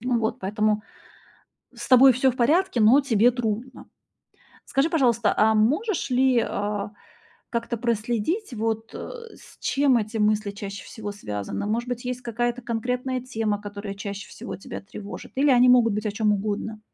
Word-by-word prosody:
Ну 245 0 0
вот 220 -1 -1
поэтому 210 +2 0 0.9
с - - -8
тобой 260 +1 +8
всё 260 +1 +2
в - - -11
порядке, 295 +3 +2
но 230 +6 +7
тебе 240 -2 +3
трудно. 235 +1 -4 0.8
Скажи, 280 +4 +1
пожалуйста, 235 -8 +2
а 220 +1 +4
можешь 295 - +1
ли, 255 0 +3
а, 205 -1 -2 0.6
как-то 235 0 -2
проследить 235 - -1
вот, 225 0 -2
э, 470 -2 -8
с - - -17
чем 275 -3 +2
эти 215 0 -2
мысли 210 0 +1
чаще 200 -1 -7
всего 210 -2 -7
связаны? 105 - -5
Может 230 +3 -1
быть, 245 0 -4
есть 250 0 -3
какая-то 240 +1 -2
конкретная 250 +2 -2
тема, 225 -5 -2
которая 205 -1 -7
чаще 200 0 -6
всего - - -8
тебя - - -8
тревожит? 200 +1 -9
Или 280 +2 +3
они 250 -1 +6
могут 240 -3 +5
быть 215 +1 -3
о 205 - -1
чём 210 0 +1
угодно? 210 +1 -3
230 Hz, 165 wpm, -24 LUFS, 210-250 Hz, 0.9 s, тобой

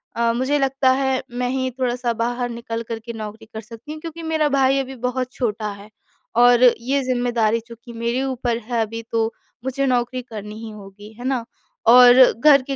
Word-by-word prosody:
अ, 235 0 +1
मुझे 260 +4 0
लगता 270 -1 +2
है 265 -1 0
मैं 245 +1 -2
ही 260 0 -1
थोड़ा-सा 245 -1 0
बाहर 240 +2 -2
निकल 230 -1 -5
कर 225 -1 -3
के 235 - -6
नौकरी 220 0 -8
कर 220 - -5
सकती 230 +5 -11
हूँ, 310 - -7
क्योंकि 330 0 -8
मेरा 315 -2 +1
भाई 270 -1 +3
अभी 270 0 -4
बहुत 255 +1 -3
छोटा 215 -3 -2
है। 200 +1 -12 0.5
और 245 +1 +6
ये 250 +3 +3
ज़िम्मेदारी 240 -3 +1
चूँकि 235 +1 -12
मेरे 235 +2 -1
ऊपर 245 -3 -1
है 235 -1 -1
अभी 225 +1 -3
तो, 225 0 0 0.3
मुझे 265 +1 -1
नौकरी 250 0 0
करनी 210 -3 -9
ही 225 - -6
होगी 205 0 -12
है 245 - -7
ना? 260 -3 0 0.4
और 245 +1 +9 0.3
घर 280 0 +6
के 275 +1 -4
245 Hz, 195 wpm, -21 LUFS, 230-260 Hz, 0.5 s, और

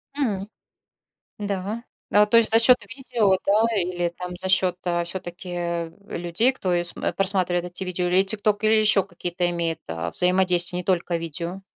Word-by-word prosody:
М, 210 -8 -2 0.9
да. 205 +3 -4 0.3
А, 210 0 +5
то 220 +2 +3
есть 230 -1 +5
за 225 - +5
счёт 245 +2 +6
видео, 235 -5 0
да, 210 +3 +4
или 175 -1 -1
там 180 +1 -8
за 190 +1 +1
счёт, 185 -1 +2
а, 175 -1 0
всё-таки 175 -1 -4 0.2
людей, 175 +9 0
кто 185 -8 -2
ис 175 - +1
э, - - -2
просматривает 185 -3 0
эти 180 +2 -1
видео, 180 -1 -2
или 185 +2 +4
"ТикТок", 205 +1 -1
или 215 - +4
ещё 210 -3 +4
какие-то 175 -2 -3
имеет, 170 -2 -2
а, 80 0 -4
взаимодействия, 180 - +3
не 180 - -5
только 180 -2 0
видео? 170 +3 -5
185 Hz, 170 wpm, -23 LUFS, 175-205 Hz, 0.9 s, счёт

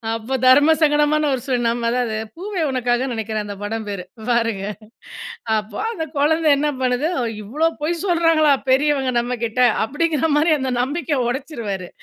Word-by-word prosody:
அப்போ 230 +4 -5
தர்மசங்கடமான 295 +1 +4
ஒரு 250 - -2
சூழல். 245 -3 0
நம்ம 235 0 -1
அதாவது, 240 -3 -1 0.2
"பூவே 380 -2 -3
உனக்காக" 250 0 0
நினைக்கிறேன், 220 -2 -3
அந்த 205 -1 -6
படம் 220 +1 -4
பேரு. 195 -3 -5 0.3
பாருங்க! 230 -4 0 0.9
அப்போ 210 0 -5
அந்த 325 -8 -4
குழந்தை 315 +2 +2
என்ன 295 +1 0
பண்ணுது, 255 +5 +1 0.3
"இவ்வளோ 305 +10 0
பொய் 335 +2 -1
சொல்றாங்களா, 330 -4 +3 0.2
பெரியவங்க 270 -1 +2
நம்ம 245 +1 -2
கிட்ட?" 230 +2 -4 0.3
அப்பிடீங்கிற 315 +2 0
மாரி, 315 +2 +3
அந்த 260 -1 -2
நம்பிக்கைய 285 +1 -1
உடைச்சுருவாரு, 235 - -4
265 Hz, 145 wpm, -20 LUFS, 230-305 Hz, 0.9 s, தர்மசங்கடமான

